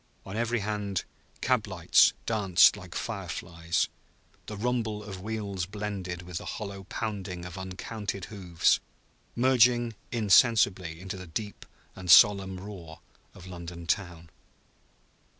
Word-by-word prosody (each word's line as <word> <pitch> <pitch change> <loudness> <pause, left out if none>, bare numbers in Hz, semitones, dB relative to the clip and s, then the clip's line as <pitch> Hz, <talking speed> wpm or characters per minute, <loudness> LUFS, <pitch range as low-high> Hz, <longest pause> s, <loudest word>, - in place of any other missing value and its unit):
On 95 - -7
every 120 0 0
hand 105 -2 -2 0.4
cab - - +1
lamps - - +4
danced 100 -5 +5
like - - -11
fire - - -4
flies; 85 0 -1 0.6
the 105 - -6
rumble 110 -2 -1
of 95 -3 -8
wheels 100 -3 -3
blended 100 -4 -5
with 90 -1 -5
the - - -10
hollow 100 -2 -7
pounding 95 -5 -4
of 90 0 -8
uncounted 95 +1 -5
hoofs, 90 -5 +2 0.6
merging 120 -1 +4 0.2
insensibly 100 -6 +3
into 95 +1 -6
the 90 -1 -9
deep 105 +6 -6 0.3
and 95 -1 -8
solemn 95 +1 +6
roar 90 -5 -9 0.4
of 90 - -12
London 85 -2 -8
town. 85 -3 -2
95 Hz, 125 wpm, -28 LUFS, 90-105 Hz, 0.6 s, solemn